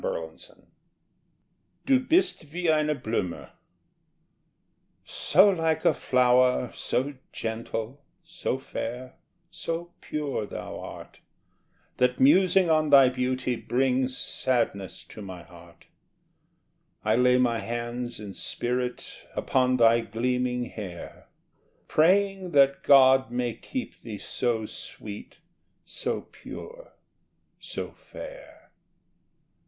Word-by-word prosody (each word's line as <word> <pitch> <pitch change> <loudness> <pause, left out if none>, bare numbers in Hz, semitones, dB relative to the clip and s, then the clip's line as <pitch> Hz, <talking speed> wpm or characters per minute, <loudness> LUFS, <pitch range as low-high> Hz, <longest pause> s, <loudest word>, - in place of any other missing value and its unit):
Du 270 -1 +4
bist 320 - +1
wie 175 0 +1
eine 150 -1 +2
Blume 110 -8 -3 1.6
So 190 +6 +4
like 160 -3 0
a - - +5
flower, 125 -1 +3
so 135 +3 -1 0.2
gentle, 115 +3 -4 0.2
So 165 -5 -3
fair, 125 -1 -6 0.3
so 170 +1 -5
pure 145 -8 -3
thou - - -7
art, - - -10 0.8
That 125 0 +2
musing 185 +6 +5
on 155 -1 +3
thy 135 -3 +8
beauty 125 0 -1
Brings 130 +1 0
sadness 115 -7 -1
to 110 - -12
my 95 -3 -8
heart. 85 -1 -17 1.2
I - - +3
lay 125 +1 +4
my 120 -2 +2
hands, 120 +2 -4
in 105 -2 -8
spirit, 125 +5 -3
Upon 130 -1 +2
thy 115 -1 +5
gleaming 125 +2 -1
hair, 95 -7 -9 0.6
Praying 190 +2 +2
that 140 -1 +4
God 130 -2 +6
may 120 -1 -1
keep 260 - -6
thee 110 -3 -7
So 115 +1 -1
sweet, 105 +7 -9 0.4
so - - -3
pure, - - -11 0.7
so - - -6
fair. - - -12
125 Hz, 100 wpm, -27 LUFS, 120-155 Hz, 1.6 s, thy